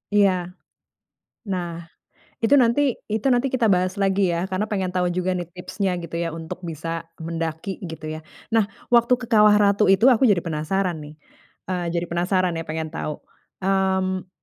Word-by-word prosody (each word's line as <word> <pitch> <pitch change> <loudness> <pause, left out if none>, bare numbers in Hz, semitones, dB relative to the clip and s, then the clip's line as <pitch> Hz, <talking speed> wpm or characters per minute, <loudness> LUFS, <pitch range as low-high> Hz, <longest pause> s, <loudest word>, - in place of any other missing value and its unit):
Iya. 200 -2 +6 1.2
Nah, 175 -2 -3 0.6
itu 265 - +5
nanti 235 +3 +3 0.3
itu 215 +3 -2
nanti 245 +2 +2
kita 250 -2 +2
bahas 185 +1 +1
lagi 195 -1 +2
ya, 170 +1 -1
karena 190 +2 -2
pengen 190 -3 -2
tahu 180 -1 +1
juga 180 +1 -1
nih 175 -2 -3
tipsnya 185 +1 -2
gitu 170 -1 -6
ya, 170 - -1
untuk 165 +2 -7
bisa 165 -1 -5
mendaki 165 +3 -4
gitu 160 -1 -6
ya. 155 - -6 0.3
Nah, 220 -3 +3 0.2
waktu 235 +1 +5
ke 250 - -8
Kawah 210 -2 +5
Ratu 205 0 +3
itu 195 +3 +4
aku 250 +1 +4
jadi 190 -5 +2
penasaran 165 +2 -1
nih, 150 0 -10 0.6
eee, 180 -2 -1
jadi 170 - 0
penasaran 180 +1 +1
ya, - - -6
pengen 160 0 -4
tahu. 155 -2 -5 0.4
Mmm, 190 -1 +1
185 Hz, 165 wpm, -23 LUFS, 170-200 Hz, 1.2 s, Iya